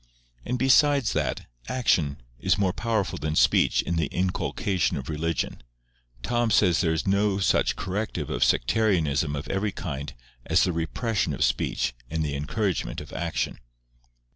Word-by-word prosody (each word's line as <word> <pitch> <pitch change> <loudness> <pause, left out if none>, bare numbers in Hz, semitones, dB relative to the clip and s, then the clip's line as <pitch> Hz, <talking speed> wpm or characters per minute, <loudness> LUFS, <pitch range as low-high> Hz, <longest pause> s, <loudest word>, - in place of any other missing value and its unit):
And 125 - -2
besides 140 0 +4
that - - -1 0.2
action 80 - +1 0.2
is 95 +7 +2
more 95 -3 +1
powerful 110 -3 -1
than 75 0 -2
speech - - +4
in 85 - -2
the 80 - +1
inculcation 95 +1 -1
of 65 +2 -6
religion, 80 -3 -2 0.6
Tom 120 -1 +1
says 90 -5 +4
there 85 -3 +1
is 80 - -1
no 100 +1 +2
such 100 - +2
corrective 95 -6 -3
of - - +1
sectarianism 80 - +2
of 70 - -5
every 100 +2 -1
kind 70 -5 -5 0.3
as - - +3
the 90 - +1
repression 100 +7 -1
of - - 0
speech - - 0 0.2
and 80 0 -1
the 70 -1 -2
encouragement 75 - -2
of - - -10
action. 85 -6 -2
90 Hz, 150 wpm, -26 LUFS, 75-105 Hz, 0.6 s, besides